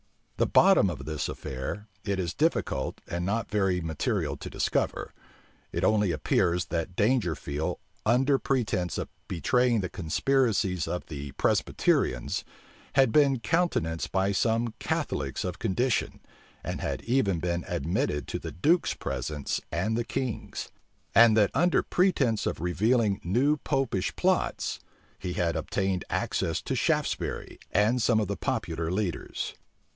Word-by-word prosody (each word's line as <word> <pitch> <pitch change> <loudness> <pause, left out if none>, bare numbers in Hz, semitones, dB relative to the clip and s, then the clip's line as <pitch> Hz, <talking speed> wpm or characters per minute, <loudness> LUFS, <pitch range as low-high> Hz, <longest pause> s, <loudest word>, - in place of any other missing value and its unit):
The - - +2
bottom 190 - +5
of 70 -6 -6
this 75 -1 -2
affair 65 +11 -5 0.2
it 100 -2 -1
is 90 -3 -2
difficult 65 - 0
and 85 +1 -3
not 105 +5 -1
very 95 -3 +2
material 80 -3 -1
to - - -7
discover. - - -1 0.6
It - - -2
only 105 -4 +3
appears, 85 +2 +1
that 85 +2 -3
Dangerfield, 85 - 0 0.3
under 130 +4 +4
pretence 105 - 0
of - - -3 0.2
betraying 120 +6 +2
the 90 - -3
conspiracies 95 - +1
of 90 - -3
the 70 -3 -7
Presbyterians, 65 -2 +1 0.5
had 135 -4 +5
been 140 -2 +4
countenanced 105 - 0
by 95 +1 +2
some 115 +2 +1
Catholics 70 -2 -2
of 90 +1 -4
condition, 115 +4 0 0.4
and - - -4
had - - -3
even 115 -8 +1
been 85 0 -1
admitted 75 -1 -1
to - - -2
the - - -6
duke's 165 - +2
presence 75 -2 -3
and 95 +7 0
the 120 - 0
king's; 125 -1 -4 0.4
and 115 -1 +7
that 105 -2 +4
under 175 +1 +3
pretence 140 - +2
of - - -2
revealing 105 +4 +1
new 130 - +2
Popish 135 - -1
plots, - - 0 0.4
he 90 -1 -3
had 85 -2 0
obtained 95 -2 -1
access 80 - -1
to - - -2
Shaftesbury - - -1
and 110 +5 +3
some 110 0 +3
of 105 - 0
the 100 -1 -3
popular 80 -1 -2
leaders. 95 -2 -2
100 Hz, 140 wpm, -28 LUFS, 85-120 Hz, 0.6 s, and